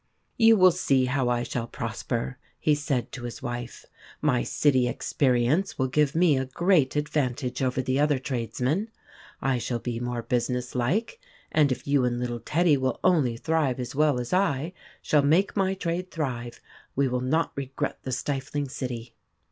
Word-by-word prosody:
" - - -46
You 225 -1 +6
will 185 -1 +7
see 135 -7 +2
how 125 -1 0
I 120 0 +1
shall 120 -1 -3
prosper," 65 - -4 0.2
he 150 - +3
said 140 -4 -1
to 120 -2 -7
his 120 +4 -7
wife. 120 -1 -5 0.2
" - - -21
My 125 -1 +1
city 130 -4 +2
experience 130 +8 +1
will 130 -1 0
give 150 +3 +2
me 165 -5 +4
a 130 - -1
great 155 0 +2
advantage 135 -4 -1
over 130 0 0
the 130 +2 0
other 145 -1 +3
trades 130 -4 -4
men. 160 - 0 0.5
I 135 -2 +1
shall 120 0 -2
be 120 0 -4
more 120 -1 -3
businesslike, 125 - -1 0.3
and 150 -3 +3
if 130 - -3
you 140 -2 +2
and 120 -1 0
little 120 -1 -3
Teddy 160 +3 +2
will 130 -2 -1
only 145 -11 +3
thrive 145 -2 0
as 125 - -4
well 145 -2 +2
as 120 +4 -4
I 175 -3 +1 0.3
shall 150 - +3
make 160 +8 +2
my 195 -1 +1
trade 180 0 -3
thrive, 125 -8 -4 0.3
we 140 0 +2
will 125 0 -1
not 155 +6 +1
regret 135 -1 -3
the 130 - -5
stifling 140 +2 -2
city." 120 -3 -5
135 Hz, 180 wpm, -26 LUFS, 125-155 Hz, 0.5 s, will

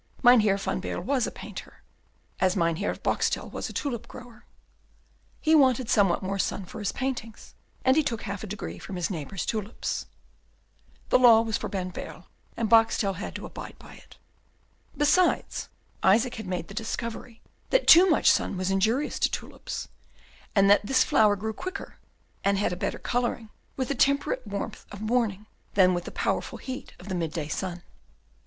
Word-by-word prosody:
Mynheer 220 -5 +6
van 195 - -2
Baerle 175 - -4
was 260 +2 +1
a - - -5
painter, - - -10 0.6
as 185 -1 +2
Mynheer 170 +1 0
Boxtel - - -1
was - - -4
a - - -9
tulip 255 -6 -3
grower; 245 -1 -12 0.9
he 315 - +2
wanted 260 -5 +4
somewhat 195 -4 +3
more 195 +1 -2
sun 190 0 -1
for 180 - -9
his 205 -1 -1
paintings, 250 -4 -5 0.3
and 260 0 +5
he 315 - +5
took 240 -7 -3
half 200 -1 -5
a - - -5
degree 205 +1 -6
from 195 - -7
his 180 +2 -2
neighbour's 175 +2 -4
tulips. 215 0 -3 1.0
The - - +5
law 235 -3 +8
was 225 -2 -2
for - - -4
Van 185 -2 -4
Baerle, - - -8 0.3
and 230 - 0
Boxtel 225 -3 +3
had 200 - -6
to - - -6
abide - - -9
by - - -14
it. - - -17 0.8
Besides, 320 +5 +2 0.3
Isaac 230 +6 +4
had 220 -3 -7
made 180 -2 -3
the - - -10
discovery 225 +2 -5 0.3
that - - +3
too 365 +3 +9
much 315 - +5
sun 195 - 0
was 185 +1 -1
injurious 220 +9 +1
to - - +3
tulips, - - -6 0.7
and 195 -1 +5
that 205 +1 +5
this 260 +5 +3
flower 210 -2 +4
grew 220 +3 -4
quicker, 370 - -7 0.4
and 200 0 +2
had 195 -2 0
a - - -2
better 180 - -3
colouring, 240 -2 -2 0.3
with 260 -2 -2
the - - +1
temperate 280 -1 +1
warmth 200 0 -5
of 200 - -8
morning, 215 -2 0 0.3
than 185 -2 +5
with 175 -1 -2
the - - -6
powerful - - -2
heat 260 0 -7
of 180 - -12
the 190 - -3
midday 165 -3 -2
sun. 175 +2 -4
215 Hz, 175 wpm, -27 LUFS, 195-245 Hz, 1.0 s, too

